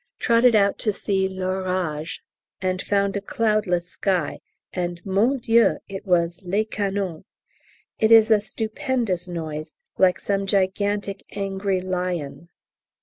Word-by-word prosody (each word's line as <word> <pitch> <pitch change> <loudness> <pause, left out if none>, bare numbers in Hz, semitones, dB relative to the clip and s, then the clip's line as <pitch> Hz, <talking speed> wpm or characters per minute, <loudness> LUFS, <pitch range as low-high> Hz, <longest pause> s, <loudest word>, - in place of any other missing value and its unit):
trotted 235 0 +4
out 200 -1 +3
to 215 - +1
see 195 -1 0
l'orage, 185 -4 -2 0.4
and 185 0 -1
found 200 -1 0
a 200 - -1
cloudless 200 -5 0
sky, 185 -6 -1 0.3
and, 175 -1 -3
mon 210 +8 +2
Dieu, 230 -1 +3
it 195 0 -7
was 170 -1 +1
les 200 +4 0
canons. 195 -5 -3 0.8
It 220 0 +3
is 225 0 +7
a 215 -2 +5
stupendous 220 - -2
noise, 155 -3 -5 0.2
like 185 -1 +4
some 195 -1 -1
gigantic 200 +1 0 0.2
angry 195 -1 -1
lion. 180 -4 -3
195 Hz, 125 wpm, -23 LUFS, 180-210 Hz, 0.8 s, is